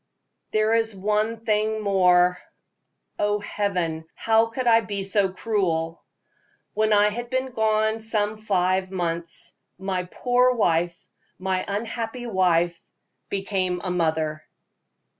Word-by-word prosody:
"There 215 +1 +2
is 225 -2 +1
one 215 +3 -1
thing 215 0 +1
more 180 -2 +4 0.8
oh, 205 0 +1
Heaven! 180 -6 -2
how 225 0 +3
could 245 +3 -4
I 230 -1 +5
be 200 -3 -3
so 195 0 +2
cruel? 170 -6 -1 0.7
when 215 0 +1
I 210 0 +5
had 240 +3 -5
been 260 0 -1
gone 220 -1 +1
some 215 -1 -1
five 185 -3 0
months, 170 -2 -3 0.2
my 190 -1 -2
poor 250 +6 +2
wife, 170 -5 +1 0.4
my 185 0 -1
unhappy 225 +3 -4
wife, 175 -5 +1 0.5
became 195 -2 -1
a 185 - -2
mother." 160 -3 0
205 Hz, 120 wpm, -24 LUFS, 180-220 Hz, 0.8 s, I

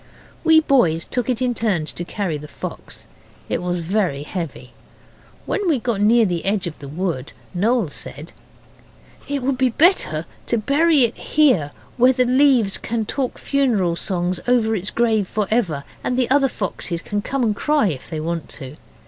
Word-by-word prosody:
We 320 -1 +6
boys 180 - +2
took 245 -1 -2
it 255 0 0
in 250 -1 +1
turns 195 -10 -1
to 175 - -5
carry 175 -4 -3
the 150 - -9
fox. - - -8 0.4
It - - -1
was 180 0 -1
very 170 -4 -1
heavy. 150 -6 -6 0.7
When 410 - -1
we 305 - +3
got 230 -4 -2
near 225 +2 +5
the 175 -4 -2
edge 195 -1 0
of 170 -3 -6
the 140 - -9
wood 160 -3 -3 0.2
Noel 215 0 +1
said 145 +2 -7 0.9
'It 280 -2 -2
would 260 0 0
be 260 -1 +3
better 235 - +2 0.2
to 235 - +1
bury 285 +5 +3
it 235 -1 +1
here, 260 - +2 0.3
where 250 +2 +5
the 250 0 +2
leaves 250 -5 +3
can 225 -1 -2
talk 260 +3 -2
funeral 230 -12 +1
songs 180 0 -2
over 230 -3 +3
its 200 0 -3
grave 220 -4 +1
for 210 +1 -1
ever, 175 -12 0 0.2
and 250 - -1
the 255 -1 +1
other 275 0 +5
foxes 180 -5 -4
can 205 0 -2
come 270 +4 -2
and 215 -3 +1
cry 295 -3 +2
if 135 -6 -6
they 160 - -4
want 165 +1 -3
to. 140 0 -8
215 Hz, 180 wpm, -21 LUFS, 170-255 Hz, 0.9 s, We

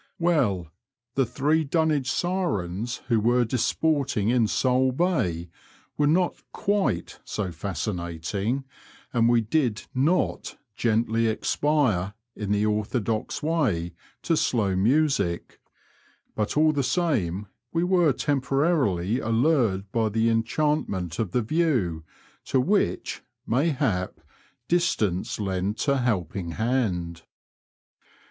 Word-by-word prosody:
Well, 120 - +1 0.4
the 135 -2 +1
three 145 +6 +1
Dunwich 150 -3 +1
sirens 120 - -2
who 115 -2 +3
were 120 +3 +3
disporting 130 -2 0
in 120 -2 +3
Sole 130 +3 +2
Bay 125 - 0 0.5
were 145 - +2
not 175 +4 +1
quite 200 - -1
so 100 -4 -3
fascinating, 95 - -3 0.5
and 115 -1 +3
we 120 -1 +4
did 115 -1 0
not 150 +8 0 0.2
gently 115 0 +1
expire, 110 - +1 0.2
in 105 -2 -4
the 105 +1 +2
orthodox 110 +3 -1
way, 115 - 0 0.3
to 165 - +2
slow 105 -10 +1
music, 105 - +1 0.7
but 105 +5 -2
all 155 0 +5
the 145 -2 0
same 125 - 0 0.3
we 165 +1 0
were 180 -4 +3
temporarily 135 - +1
allured 115 -5 +1
by 115 -2 +1
the 115 +2 +1
enchantment 115 - 0
of 110 -5 0
the 120 +6 0
view, 115 - 0 0.4
to 130 - +1
which, 165 - 0 0.2
mayhap, 130 - 0 0.5
distance 110 - 0
lent 100 +4 -2
a 140 -1 +3
helping 95 -7 -1
hand. 100 -8 -1
115 Hz, 110 wpm, -25 LUFS, 100-150 Hz, 0.7 s, all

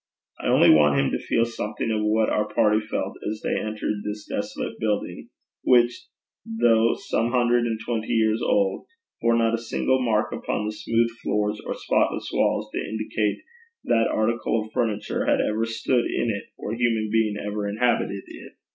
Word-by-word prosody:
I - - -3
only - - +6
want 75 -2 +5
him 70 - +1
to - - -1
feel 115 - +1
something 115 -1 -3
of 110 -1 0
what 110 +1 +2
our 105 0 0
party 105 0 +3
felt 110 0 -4
as 110 0 -5
they - - 0
entered 105 -1 -3
this 105 0 -5
desolate - - -4
building, 105 -2 -2 0.3
which, 120 -1 +3 0.4
though 115 0 +3
some 115 - -1
hundred 120 -1 +2
and 115 -1 -2
twenty 115 -2 -2
years 110 -1 +2
old, 100 -2 +1 0.3
bore 115 0 +3
not 115 -1 +2
a 115 - 0
single 130 +3 0
mark 110 -3 +1
upon 105 - -3
the 105 - -2
smooth 115 +2 0
floors 105 0 -1
or - - -4
spotless - - 0
walls - - +1
to - - -3
indicate 110 - -2 0.4
that 115 -1 +2
article 115 0 0
of 110 - -15
furniture 105 -3 -1
had - - +3
ever 110 +1 0
stood 120 +2 0
in 115 - 0
it, 100 - -5
or 105 - -5
human 115 -2 0
being 110 -2 +1
ever 105 0 -3
inhabited 110 -2 0
it. - - -12
110 Hz, 175 wpm, -24 LUFS, 105-115 Hz, 0.4 s, only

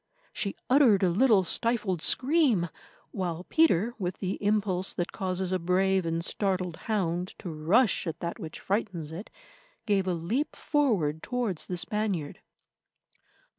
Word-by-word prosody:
She 200 - -2
uttered 250 -6 +5
a 180 - +3
little 215 0 +4
stifled 210 -4 0
scream, 255 - +2 0.4
while 180 -3 -3
Peter, 235 - +3
with 180 -1 -3
the 190 +1 -4
impulse 200 -3 0
that 175 - -2
causes 185 -1 -2
a 185 - +1
brave 185 +1 +1
and 165 +1 -1
startled 185 -4 -1
hound 180 -4 -1
to 175 - -6
rush 185 +8 +2
at 165 0 -4
that 170 0 -4
which 160 -1 -7
frightens 190 -6 -2
it, 175 +7 -7 0.6
gave 195 -3 +1
a 180 - +1
leap 215 - -2
forward 200 - +1
towards 240 -9 -2
the 180 - -3
Spaniard. 195 -5 -2
190 Hz, 140 wpm, -28 LUFS, 175-215 Hz, 0.6 s, uttered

